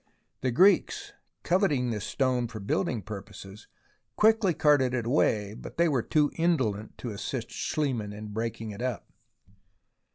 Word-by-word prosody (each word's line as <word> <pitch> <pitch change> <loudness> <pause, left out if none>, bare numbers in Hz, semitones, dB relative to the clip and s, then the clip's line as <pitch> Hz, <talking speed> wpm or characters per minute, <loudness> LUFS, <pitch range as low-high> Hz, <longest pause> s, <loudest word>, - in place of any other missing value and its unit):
The 130 - +1
Greeks, 185 +12 +3 0.3
coveting 155 - +2
this 105 -2 -3
stone 130 -3 0
for 110 - -8
building 110 - -1
purposes, 100 0 -9 0.5
quickly 215 -5 +4
carted 145 -5 +3
it 120 -2 -2
away, 105 -6 +1
but - - -10
they 170 0 +4
were 135 -6 +1
too 150 +4 +2
indolent 130 -12 0
to 120 - -5
assist 115 +4 -5
Schliemann 125 -9 -2
in 105 +1 -8
breaking 115 +1 -4
it 100 +3 -8
up. 125 -4 -4
120 Hz, 140 wpm, -28 LUFS, 105-150 Hz, 0.5 s, quickly